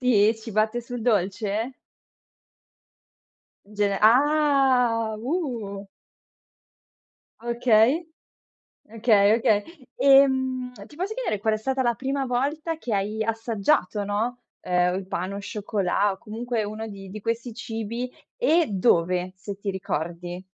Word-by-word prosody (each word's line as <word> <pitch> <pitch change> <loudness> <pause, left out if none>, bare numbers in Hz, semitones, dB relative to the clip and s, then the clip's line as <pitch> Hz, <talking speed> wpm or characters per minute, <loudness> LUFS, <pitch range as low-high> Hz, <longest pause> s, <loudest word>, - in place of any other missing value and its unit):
Sì? 220 -4 +4
Ci 225 - -8
batte 215 +3 +1
sul 240 0 -6
dolce? 210 +2 0 2.0
Gene 200 -1 +1
ah, 255 -3 +4
uh. 235 - -3 1.6
Okay, 240 +6 +3 0.8
okay, 215 -2 +4
okay. 210 -3 +2 0.4
Ehm, 260 -2 +4 0.2
ti 295 - -16
posso 375 +6 -3
chiedere 470 - -2
qual 220 +1 +1
è - - -3
stata 265 +4 -1
la 240 -1 +2
prima 270 +4 -2
volta 290 +6 -1
che 245 -8 -4
hai 210 +3 -2
assaggiato, 220 -1 0
no, 220 +5 -2 0.2
uhm, 180 0 +1
il 190 0 -5
pain 185 +1 -3
au 200 - -4
chocolat 200 -1 0
o - - -12
comunque 230 +2 -3
uno 215 +2 -5
di 195 -2 -9
di 215 - -7
questi 230 +2 -3
cibi, 230 +1 -4 0.3
e 345 -9 +3
dove, 180 -2 +1
se 195 +1 -7
ti 200 0 -3
ricordi? 175 -1 -4
220 Hz, 120 wpm, -25 LUFS, 200-250 Hz, 2.0 s, Sì